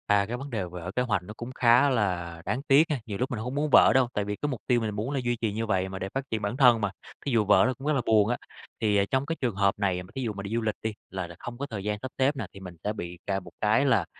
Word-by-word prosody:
À, 100 -1 +4
cái 120 +4 -4
vấn 140 +3 -7
đề 110 -7 -2
vỡ 90 0 -7
kế 125 - +2
hoạch 105 -7 0
nó 105 - -9
cũng 120 +2 -6
khá 125 +3 +5
là 90 -8 -1
đáng 110 +7 -1
tiếc 140 +1 +7
ha. 150 -4 0
Nhiều 105 -3 -4
lúc 125 +4 -1
mình 120 - -2
hông 125 +4 -4
muốn 150 +1 0
vỡ - - +7
đâu, 130 -2 +4
tại 105 - -1
vì 105 0 -2
cái 145 - -3
mục 130 -5 -4
tiêu 120 -2 +3
mình 110 -2 -2
muốn 110 +6 -2
là 140 - 0
duy 120 0 +1
trì 110 -3 0
như 115 +2 -2
vậy 95 -3 0
mà, 95 0 -6
để 95 - -4
phát 135 - -1
triển 110 -1 -2
bản 105 +4 -2
thân 125 -5 +6
mà, 100 -2 0 0.3
thí 140 - -1
dụ 115 -3 +3
vỡ 95 -2 +6
nó 130 - +1
cũng 135 +3 -8
rất 155 - +3
là 135 - +1
buồn 110 -1 +4
á. 120 - 0 0.4
Thì, 105 -2 +2
ờ, 100 - +3
trong 130 +1 +1
cái 165 +2 -2
trường 120 -6 0
hợp 100 0 +2
này 95 -3 0
mà 90 - -15
thí 135 - -3
dụ 115 -4 -2
mà 100 0 -6
đi 100 - -6
du 115 - +1
lịch 110 -2 -1
đi, 110 -1 -2 0.2
là 95 -2 -4
là 85 - -11
không 120 0 -7
có 140 - -3
thời 110 -8 -6
gian 105 0 -1
sắp 130 - -5
xếp 135 +2 +2
nè, 125 -6 -4
thì 100 - -10
mình 90 -2 -9
sẽ 105 - -1
bị 85 -4 -6
cà 95 -1 0
một 90 -2 -13
cái 110 +6 +3
là, 115 -10 +3
110 Hz, 340 wpm, -27 LUFS, 100-125 Hz, 0.4 s, tiếc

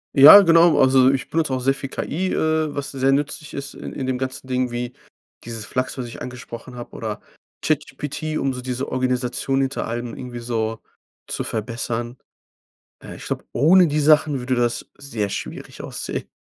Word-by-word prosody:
Ja, 150 +9 +11
genau. 165 -3 +5
Also, 130 0 +6
ich 135 - -3
benutze 155 -4 0
auch - - -2
sehr 135 +2 +2
viel 135 0 -6
KI, 185 +7 -2
äh, 155 -1 0
was 140 -1 -4
sehr 135 0 +1
nützlich 145 +1 -2
ist 140 0 -5
in - - -8
in 135 - -4
dem 130 -1 -1
ganzen 130 0 -4
Ding, 125 0 0
wie 120 +1 -4 0.5
dieses 115 -2 -6
Flux, 130 +4 -2
was 125 - -3
ich 115 - -9
angesprochen 125 0 -8
habe 120 -1 -8
oder - - -4 0.4
ChatGPT, 155 +1 -2
um 135 -1 0
so 125 - -6
diese 130 +2 -4
Organisation 130 +1 0
hinter 135 -3 -2
allem 120 0 -4
irgendwie 125 -2 -7
so 115 -2 -3 0.4
zu - - -4
verbessern. 115 +2 -3 0.9
Äh, - - -9
ich - - -10
glaube, - - -3
ohne 170 +7 +5
die 150 +1 0
Sachen 150 -1 +4
würde 125 +1 -1
das 120 -1 -1
sehr 115 -7 -3
schwierig - - -6
aussehen. - - -5
130 Hz, 180 wpm, -22 LUFS, 120-145 Hz, 0.9 s, Ja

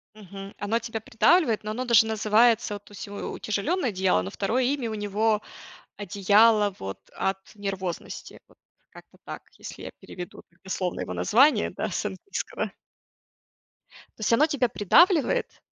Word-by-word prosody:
Мгм, 195 -1 -10
оно 220 +3 0
тебя 225 -1 -5
придавливает, 225 - +2
но 210 - -4
оно 250 +4 -3
даже 235 -3 +6
называется, 220 +1 +3
вот, 205 - -10
то - - -19
есть 205 - -8
у 200 - -10 0.2
утяжеленное 255 - -1
одеяло, 190 - +1
но 95 - -5
2 220 - 0
имя 255 -2 -1
у - - -4
него: 210 +1 0 0.6
одеяло, 205 +1 +3
вот, 95 0 -6 0.2
от 190 0 -1 0.2
нервозности, 195 -3 -5
вот, - - -24 0.3
как-то - - -17
так, - - -7 0.2
если - - -9
я - - -6
переведу 180 -1 -9 0.2
дословно 185 -1 -3
его 90 - -4
название, 230 - +3
да, - - -4
с - - -2
английского. 395 - -5 1.5
То - - -13
есть 215 - +2
оно 290 +7 +5
тебя 270 -5 +1
придавливает 345 - +3
215 Hz, 155 wpm, -26 LUFS, 195-235 Hz, 1.5 s, даже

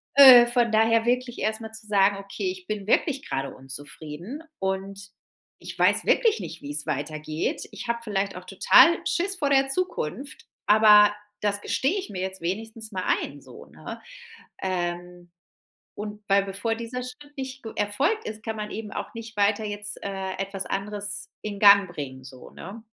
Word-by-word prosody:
Äh, 255 -4 +10
von 240 -1 +2
daher 225 +1 +3
wirklich 245 0 0
erst 220 +1 -1
mal 220 0 -7
zu 220 -1 -12
sagen: 200 -1 +3
„Okay, 200 - -4
ich 370 -1 -11
bin 205 -2 -4
wirklich 275 +4 +1
grade 135 0 -3
unzufrieden 150 - -9 0.2
und 195 +1 -4 0.5
ich - - -8
weiß - - +3
wirklich 450 -2 +3
nicht, 165 - -7
wie's 145 +1 -4
weitergeht. 155 +2 -3
Ich - - -8
habe 235 0 -1
vielleicht 200 -3 -2
auch 180 0 -9
total 200 - +6
Schiss 380 +3 0
vor 285 -5 0
der 270 -1 +3
Zukunft, 275 - -3 0.2
aber 210 -1 +7 0.3
das 205 -1 -1
gestehe 285 - 0
ich 380 - -5
mir 190 -3 -5
jetzt 190 -1 -5
wenigstens 220 +5 -5
mal 185 -2 -3 0.2
ein." - - -8
So, - - -13
ne? - - -9 0.6
Ähm, 175 -1 -4 0.7
Und 210 0 -6
weil 195 0 +4
bevor 200 +4 -2
dieser 235 +2 -5
Schritt 290 +4 -11
nicht 265 -1 -6
ge 225 - -6
erfolgt 275 - 0
ist, 215 0 -7
kann 220 -1 -4
man 210 0 -4
eben 215 -1 -6
auch - - -6
nicht 230 -1 -9
weiter 205 +1 +2
jetzt, 205 0 -5
äh, 190 -1 -4
etwas 195 0 -4
anderes 205 +1 -4
in 210 -1 -5
Gang 200 -1 +7
bringen 130 -6 -7
so, 130 0 -12
ne? 210 +5 -10
210 Hz, 170 wpm, -25 LUFS, 190-235 Hz, 0.7 s, Äh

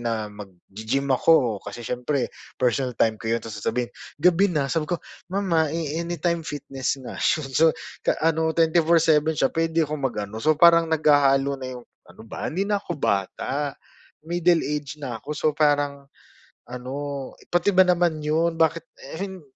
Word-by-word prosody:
na 115 -2 -2
mag-gi-gym 105 +6 -5
ako, 125 -7 +3
kasi 120 - -8
siyempre 125 +2 -2 0.2
personal 125 0 0
time 110 -1 +2
ko 115 - -5
'yun 115 - +2
tapos 110 -2 -8
sasabihin, 120 +1 -2 0.2
"Gabi 180 +5 +4
na." 150 -5 0
Sabi 155 +1 -1
ko, 175 - 0 0.3
"Mama, 180 -5 +1
eh, 160 -1 -2
Anytime 170 0 -1
Fitness 140 -3 -3
nga - - -7
'yun 155 -3 +1
so 160 +5 +5 0.3
ta - - +1
ano 160 0 +2
24/7 160 -1 +3
siya 135 - +1
puwede 165 0 +1
ko 155 - -4
mag-ano." 110 -5 -3
So 155 +2 +3
parang 170 0 +6
naghahalo 140 -3 +3
na 130 - -5
yung 120 - -14 0.2
ano - - -14
ba - - -5
hindi 190 +5 -1
na 205 -1 0
ko 175 -5 -5
bata, 135 +7 -1 0.5
middle 175 0 +2
age 150 0 -4
na 125 -6 -5
ako 150 +4 -6
so 155 - -1
parang, 145 -2 +1 0.6
ano 125 +1 -6 0.6
pati 175 +3 +2
ba 185 - +8
naman 175 -3 +1
'yun, 165 +2 +1
bakit, 165 +1 +2 0.2
eh, 160 - -7
hin 190 -2 -5
150 Hz, 165 wpm, -24 LUFS, 130-165 Hz, 0.6 s, ba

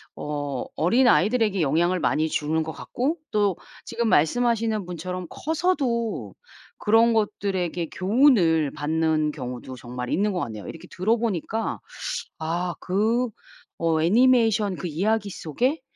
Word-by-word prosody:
어 145 -3 -4
어린아이들에게 220 0 +3
영향을 170 +5 +2
많이 160 0 +1
주는 155 +1 0
것 160 - -5
같고 280 - -2
또 205 -4 +1 0.3
지금 235 0 -2
말씀하시는 225 +3 +2
분처럼 180 +1 -5
커서도 285 -9 -1 0.4
그런 225 +2 +4
것들에게 190 -6 -1
교훈을 185 - +3
받는 155 0 0
경우도 125 -2 -7
정말 125 +1 -6
있는 205 +3 +1
것 180 - -1
같네요. 110 -3 -6
이렇게 165 - -9
들어 210 +6 +1
보니까 220 0 -2 0.6
'아 170 +2 -2
그 225 +6 +1 0.5
어 160 -1 +2
애니메이션 225 0 +4
그 - - -6
이야기 200 +6 0
속에 250 - -1
185 Hz, 285 characters per minute, -24 LUFS, 160-230 Hz, 0.6 s, 그런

